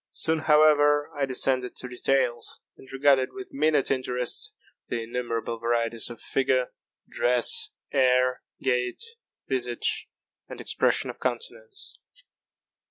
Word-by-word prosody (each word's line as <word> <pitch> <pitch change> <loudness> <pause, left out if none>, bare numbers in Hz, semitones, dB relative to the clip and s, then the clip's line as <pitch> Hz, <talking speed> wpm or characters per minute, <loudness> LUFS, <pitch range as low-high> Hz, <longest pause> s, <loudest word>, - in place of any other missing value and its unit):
Soon, 160 0 0
however, 150 -1 +4
I 145 -2 -1
descended 130 -1 0
to - - -3
details, 125 -1 0 0.2
and 130 - -15
regarded 135 -1 +3
with 195 -1 -9
minute 150 0 +2
interest 125 -2 -2 0.4
the 115 -1 -2
innumerable 115 -1 -3
varieties 115 0 0
of 120 - -9
figure, 130 -1 0 0.4
dress, 125 0 +3 0.2
air, 125 -1 +3 0.2
gait, 125 - 0 0.4
visage, 125 -3 -1 0.4
and - - -8
expression - - +1
of - - -18
countenance. 460 -4 -4
130 Hz, 110 wpm, -26 LUFS, 125-145 Hz, 0.4 s, however